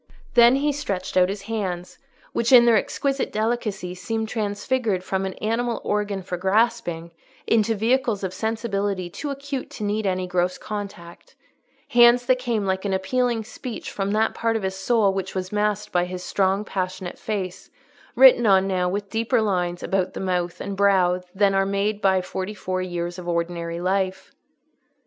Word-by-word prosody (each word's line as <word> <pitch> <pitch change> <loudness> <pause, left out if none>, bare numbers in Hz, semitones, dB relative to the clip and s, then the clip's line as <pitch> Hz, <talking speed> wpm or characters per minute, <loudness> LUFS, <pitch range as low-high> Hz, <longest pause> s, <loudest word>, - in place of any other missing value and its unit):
Then 235 +2 +7
he 290 +2 +1
stretched 195 -10 -4
out 185 0 +4
his 200 0 -5
hands, 190 -5 -4 0.3
which, 235 +1 0
in 245 -2 +9
their 235 -1 +5
exquisite 275 +5 -1
delicacy, 215 -5 -2
seemed 220 +4 -3
transfigured 210 -1 -1
from 190 0 -1
an 190 - -5
animal 230 +2 -1
organ 205 -2 -1
for 180 0 -4
grasping 190 -3 0 0.3
into 225 0 +2
vehicles 230 -1 +1
of 185 -1 -3
sensibility 200 -4 -2
too 290 - -5
acute 280 -1 -5
to - - -7
need 210 0 -1
any 185 -1 0
gross 180 0 0
contact: 200 -5 -8 0.5
hands 240 0 +6
that 255 0 +3
came 235 -5 -1
like 190 0 -1
an 200 -2 -1
appealing 235 +4 0
speech 235 +1 -7
from 195 0 -2
that 215 +2 +1
part 230 0 0
of 220 - -2
his 190 0 -2
soul 200 0 +2
which 190 0 -4
was 185 0 -3
masked 210 0 -1
by 175 0 +2
his 180 0 -6
strong 195 +2 +1
passionate 185 -2 -4
face, 190 -4 -4 0.5
written 250 -2 +7
on 190 -1 +5
now 180 -2 0
with 200 +2 -3
deeper 230 +2 +1
lines 180 -5 -1
about 190 -1 -1
the - - -4
mouth 180 -2 -2
and 200 0 -4
brow 190 -2 +3
than 200 0 +3
are 195 0 +3
made 200 +2 -1
by 190 -1 +3
forty 190 +3 -5
four 185 -2 -3
years 175 -1 -4
of 175 - -8
ordinary 170 0 -2
life. 185 +1 -1
200 Hz, 170 wpm, -23 LUFS, 185-225 Hz, 0.5 s, in